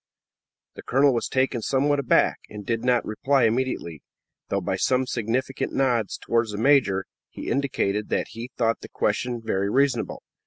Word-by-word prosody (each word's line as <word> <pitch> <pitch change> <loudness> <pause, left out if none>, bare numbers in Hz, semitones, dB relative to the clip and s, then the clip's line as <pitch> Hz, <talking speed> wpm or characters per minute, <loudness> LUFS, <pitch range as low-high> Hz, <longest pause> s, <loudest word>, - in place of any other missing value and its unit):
The - - -10
colonel 135 +1 +3
was 120 - -1
taken 130 -2 0
somewhat 140 +4 +1
aback, 135 - +2
and 105 -1 -9
did 115 +1 -1
not 125 -1 +2
reply 135 +5 +1
immediately, 115 - -1 0.5
though 100 - 0
by 95 0 -2
some 130 +7 +1
significant 125 +3 -2
nods 120 -6 +1
towards 115 -2 0
the - - -4
major, 110 -6 +3 0.2
he - - -6
indicated 105 -7 -1
that - - -1
he 115 +2 -7
thought 115 -1 +1
the - - -10
question 120 +2 -1
very 100 -2 0
reasonable. 130 0 0
120 Hz, 160 wpm, -25 LUFS, 105-130 Hz, 0.5 s, colonel